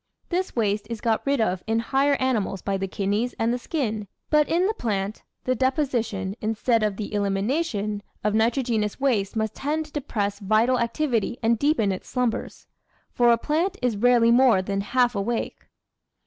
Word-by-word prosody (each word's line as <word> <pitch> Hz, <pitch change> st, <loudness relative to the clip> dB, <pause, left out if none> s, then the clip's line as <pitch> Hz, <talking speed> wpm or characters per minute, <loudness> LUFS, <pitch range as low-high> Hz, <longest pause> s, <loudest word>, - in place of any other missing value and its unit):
This 370 Hz, +1 st, -2 dB
waste 210 Hz, -2 st, 0 dB
is 230 Hz, -2 st, -4 dB
got 225 Hz, -1 st, 0 dB
rid 280 Hz, -1 st, +2 dB
of 185 Hz, -5 st, 0 dB
in 225 Hz, 0 st, +1 dB
higher 270 Hz, +5 st, +2 dB
animals 225 Hz, -8 st, -1 dB
by 195 Hz, -, -1 dB
the 195 Hz, 0 st, -2 dB
kidneys 205 Hz, +5 st, -1 dB
and 230 Hz, +1 st, +1 dB
the 250 Hz, -, -2 dB
skin. 225 Hz, -7 st, -3 dB, 0.2 s
But 300 Hz, -1 st, +4 dB
in 345 Hz, +3 st, +2 dB
the 425 Hz, -, +1 dB
plant 205 Hz, -, -3 dB, 0.2 s
the 255 Hz, -, 0 dB
deposi 260 Hz, -1 st, +1 dB
tion, 195 Hz, -3 st, -5 dB
instead 225 Hz, +2 st, +1 dB
of 210 Hz, -2 st, 0 dB
the 215 Hz, -1 st, -5 dB
elimination, 205 Hz, +1 st, -1 dB, 0.2 s
of 210 Hz, 0 st, +1 dB
nitrogenous 225 Hz, -1 st, +1 dB
waste 230 Hz, -7 st, +1 dB
must 220 Hz, -1 st, -1 dB
tend 310 Hz, +3 st, -2 dB
to 305 Hz, -, -16 dB
depress 205 Hz, -9 st, -2 dB
vital 220 Hz, +5 st, +2 dB
activity 235 Hz, -2 st, 0 dB
and 225 Hz, 0 st, +2 dB
deepen 285 Hz, -9 st, +2 dB
its 185 Hz, -, -6 dB
slumbers. 250 Hz, -3 st, -2 dB, 0.5 s
For 240 Hz, -1 st, +4 dB
a 235 Hz, -, +4 dB
plant 330 Hz, -, -1 dB
is 245 Hz, -3 st, +1 dB
rarely 235 Hz, +1 st, +4 dB
more 240 Hz, -6 st, +5 dB
than 195 Hz, +1 st, -2 dB
half 245 Hz, +3 st, +2 dB
awake. 225 Hz, +3 st, -3 dB
230 Hz, 175 wpm, -24 LUFS, 205-260 Hz, 0.5 s, more